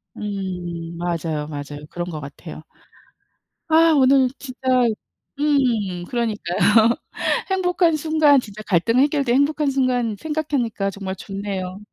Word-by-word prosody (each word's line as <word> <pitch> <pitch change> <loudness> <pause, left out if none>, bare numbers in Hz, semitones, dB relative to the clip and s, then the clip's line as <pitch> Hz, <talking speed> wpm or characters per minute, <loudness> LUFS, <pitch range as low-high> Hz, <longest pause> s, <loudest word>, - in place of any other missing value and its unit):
음 180 -5 -5
맞아요, 165 -3 -2
맞아요. 145 0 -7
그런 175 0 -4
것 155 - -5
같아요. 155 +3 -10 1.1
아 325 +1 +5
오늘 265 -1 +5
진짜 255 -3 -10 0.8
음 235 -12 +1
그러니까요. 225 0 +2 0.6
행복한 360 -3 +2
순간 310 -2 +4
진짜 215 -4 -6
갈등 215 +6 +2
해결된 275 -3 +2
행복한 290 +1 +2
순간 250 -5 0
생각하니까 280 -10 -1
정말 195 -1 -5
좋네요. 195 -1 -5
220 Hz, 255 characters per minute, -21 LUFS, 180-280 Hz, 1.1 s, 아